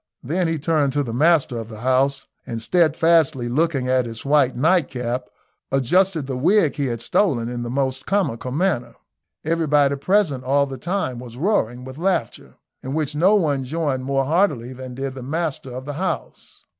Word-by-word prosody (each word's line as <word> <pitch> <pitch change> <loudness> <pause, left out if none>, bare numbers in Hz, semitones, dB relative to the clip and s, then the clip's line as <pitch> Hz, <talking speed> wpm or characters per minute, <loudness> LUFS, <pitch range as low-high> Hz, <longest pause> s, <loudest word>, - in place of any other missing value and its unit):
Then 170 +6 0
he 165 0 -1
turned 150 -2 +1
to 145 0 +1
the 115 -4 -5
master 145 -3 +2
of 115 -1 -7
the 110 -1 -9
house, 135 +2 +1 0.2
and 115 - -4
steadfastly 160 -2 +2
looking 140 0 0
at 130 -1 +2
his 115 +2 -8
white 140 -3 +3
night 160 +4 +2
cap, 125 0 -3 0.5
adjusted 160 +5 +2
the 135 -1 -4
wig 165 +4 +3
he 140 -2 0
had 115 -2 -3
stolen 120 - +1
in 120 0 -4
the 120 - -4
most 130 0 -2
comical 180 - 0
manner. 155 -3 -1 0.5
Everybody 150 -3 +2
present 160 -5 +1
all 140 +2 +2
the 135 -2 -8
time 170 -6 -2
was 120 -1 -10
roaring 125 - 0
with 130 +3 -9
laughter, 175 - -2 0.3
in 130 +2 -5
which 155 -2 -1
no 180 +8 +4
one 145 -9 +1
joined 140 -2 -2
more 135 0 0
heartily 145 - +1
than 130 -1 -8
did 135 0 -4
the 130 - -8
master 150 0 -3
of 130 +1 -7
the 145 - -4
house. 185 +6 -5
140 Hz, 180 wpm, -22 LUFS, 125-165 Hz, 0.5 s, no